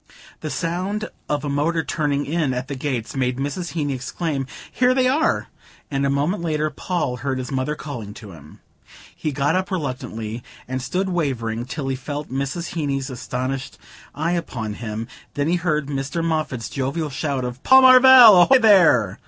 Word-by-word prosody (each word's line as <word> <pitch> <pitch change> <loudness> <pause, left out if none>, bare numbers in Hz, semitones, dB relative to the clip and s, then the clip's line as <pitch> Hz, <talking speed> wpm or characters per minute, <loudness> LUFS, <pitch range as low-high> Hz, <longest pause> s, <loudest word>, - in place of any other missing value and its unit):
The 155 - -5
sound 185 +7 -3 0.2
of 145 -1 -1
a - - -2
motor 155 +4 0
turning 145 -3 -1
in 150 -4 -1
at 125 +1 -4
the 140 - -5
gates 130 -4 -3
made 130 -1 0
Mrs. 145 +6 -4
Heeny 145 -4 -1
exclaim 135 +2 -3 0.2
"Here 250 0 +2
they 255 -1 +3
are!" 305 +6 +1 0.5
and 140 0 0
a - - 0
moment 145 +8 0
later 155 -2 -1
Paul 155 -4 -2
heard 135 0 -2
his 130 +1 -5
mother 135 +3 -1
calling 115 -10 -7
to 105 -3 -11
him. 75 -3 -15 0.5
He 155 - -3
got 145 +4 0
up 185 0 -1
reluctantly, 125 - -4 0.3
and 130 +1 -3
stood 185 +9 -2
wavering 120 -9 -2
till 140 +1 -5
he 135 - -1
felt 145 +3 -6
Mrs. 140 +6 -3
Heeny's 140 -4 -2
astonished 130 +2 -4 0.4
eye 160 +3 -1
upon 125 -11 -3
him. 110 0 -5 0.3
Then 145 +1 0
he 175 +2 +2
heard 155 -4 0
Mr. 140 +4 -3
Moffatt's 155 -7 -2
jovial 140 +3 -3
shout 140 -2 -2
of 125 +1 -6
"Paul 265 0 +7
Marvell, 255 -6 +9
ahoy 265 +9 +6
there!" 175 - +4
145 Hz, 175 wpm, -22 LUFS, 130-170 Hz, 0.5 s, Marvell